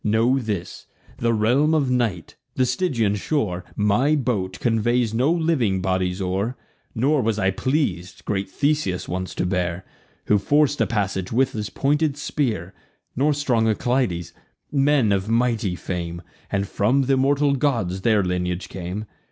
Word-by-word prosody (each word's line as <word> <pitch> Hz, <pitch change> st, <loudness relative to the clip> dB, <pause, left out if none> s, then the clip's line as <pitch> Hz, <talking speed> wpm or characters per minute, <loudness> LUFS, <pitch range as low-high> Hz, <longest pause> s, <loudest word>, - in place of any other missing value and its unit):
Know 115 Hz, +5 st, +2 dB
this, 105 Hz, -8 st, -5 dB, 0.3 s
the 115 Hz, 0 st, +2 dB
realm 125 Hz, +8 st, +3 dB
of 140 Hz, -5 st, +1 dB
night; 115 Hz, -9 st, -1 dB, 0.2 s
the 130 Hz, -, +2 dB
Stygian 125 Hz, -, 0 dB
shore: 100 Hz, -, -1 dB
My 105 Hz, +9 st, +2 dB
boat 105 Hz, -8 st, -1 dB
conveys 120 Hz, 0 st, +1 dB
no 130 Hz, +7 st, +2 dB
living 160 Hz, -, +1 dB
bodies 95 Hz, 0 st, -1 dB
o'er; 95 Hz, +6 st, -2 dB, 0.4 s
Nor 140 Hz, +5 st, +2 dB
was 110 Hz, -2 st, 0 dB
I 95 Hz, -2 st, +2 dB
pleas'd 100 Hz, -, -2 dB
great 95 Hz, -1 st, -2 dB
Theseus 140 Hz, -9 st, 0 dB
once 95 Hz, +1 st, -4 dB
to -, -, -1 dB
bear, 90 Hz, -1 st, -1 dB, 0.4 s
Who 105 Hz, -, +3 dB
forc'd 145 Hz, +5 st, +2 dB
a -, -, +2 dB
passage 95 Hz, -4 st, -2 dB
with 130 Hz, +3 st, +2 dB
his 105 Hz, -2 st, -4 dB
pointed 145 Hz, +5 st, 0 dB
spear, 110 Hz, -, -2 dB, 0.4 s
Nor 145 Hz, +4 st, +2 dB
strong 120 Hz, -6 st, +1 dB
Alcides, 110 Hz, -7 st, 0 dB, 0.4 s
men 140 Hz, -5 st, +3 dB
of 100 Hz, +1 st, 0 dB
mighty 115 Hz, -5 st, +1 dB
fame, 85 Hz, -1 st, -5 dB, 0.3 s
And 100 Hz, -1 st, 0 dB
from 130 Hz, +8 st, +1 dB
th' 135 Hz, -, 0 dB
immortal 140 Hz, +2 st, +3 dB
gods 115 Hz, -10 st, 0 dB
their 110 Hz, -1 st, +3 dB
lineage 90 Hz, 0 st, -2 dB
came. 95 Hz, +4 st, -5 dB
110 Hz, 150 wpm, -23 LUFS, 95-135 Hz, 0.4 s, realm